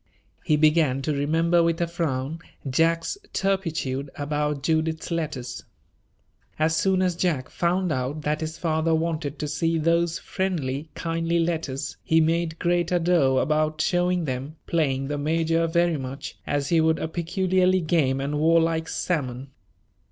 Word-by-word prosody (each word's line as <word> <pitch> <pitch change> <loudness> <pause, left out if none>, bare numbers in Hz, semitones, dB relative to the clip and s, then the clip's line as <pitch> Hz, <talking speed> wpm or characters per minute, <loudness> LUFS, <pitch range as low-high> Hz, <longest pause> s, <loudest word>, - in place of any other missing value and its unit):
He 155 - +3
began 150 -3 +3
to 150 - 0
remember 165 +4 +2
with 165 0 +1
a 170 - +2
frown 160 -3 -2 0.3
Jack's 165 - +1
turpitude 160 -8 -1
about 150 -1 -2
Judith's 160 +1 0
letters. 145 -7 -3 0.9
As 160 +1 +2
soon 190 +2 +2
as 180 -2 +1
Jack 165 -8 -1
found 180 +1 0
out 140 +2 -2
that 150 +2 -1
his 160 0 -4
father 160 -1 +1
wanted 160 -3 -2
to 150 - -3
see 165 +3 0
those 165 +1 +1
friendly, 155 -6 -3
kindly 165 0 -1
letters, 165 -5 -2
he 160 - +3
made 165 0 +1
great 175 0 +1
ado 170 -7 +3
about 155 +2 +1
showing 175 +1 +1
them, 135 +3 -4
playing 135 -5 0
the 145 0 -2
major 165 +2 +1
very 170 -1 +2
much 135 0 -6
as 145 -1 -1
he 165 -2 +4
would 160 0 +3
a - - -2
peculiarly 185 +2 +1
game 155 -5 +1
and 145 +2 -2
warlike 165 0 +2
salmon. 135 -6 -2
160 Hz, 145 wpm, -25 LUFS, 145-170 Hz, 0.9 s, he